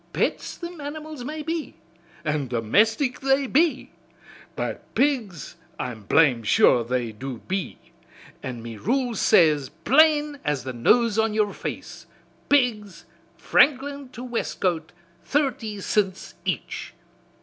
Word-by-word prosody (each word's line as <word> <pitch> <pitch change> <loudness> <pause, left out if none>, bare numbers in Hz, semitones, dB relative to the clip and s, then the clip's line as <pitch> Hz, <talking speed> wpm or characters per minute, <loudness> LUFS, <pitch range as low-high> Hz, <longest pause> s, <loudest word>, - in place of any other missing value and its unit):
Pets - - -1
thim 345 -2 -8
animals 300 -1 -7
may 305 +4 -5
be, 325 0 -4 0.5
an' 150 -3 -1
domestic 215 - +1
they 270 +1 +2
be, 285 +1 +1 0.6
but - - -3
pigs 225 - -1 0.2
I'm 110 -5 -5
blame 135 -2 +4
sure 115 +2 +4
they 120 -1 -2
do 125 +4 -6
be, 190 -1 -3 0.6
an' 120 -3 -6
me 115 -2 -7
rules 245 - -1
says 150 -6 +4
plain 295 - +3
as 145 -4 -1
the 130 0 -5
nose 220 - +3
on 220 -1 +1
yer 210 -2 +1
face, - - -7 0.4
'Pigs 225 -9 +1 0.3
Franklin 280 -1 +2
to 245 0 -9
Westcote, 180 -8 -2 0.3
thirty 265 -7 -1
cints 195 -1 -1
each.' - - -4
215 Hz, 120 wpm, -24 LUFS, -, 0.6 s, blame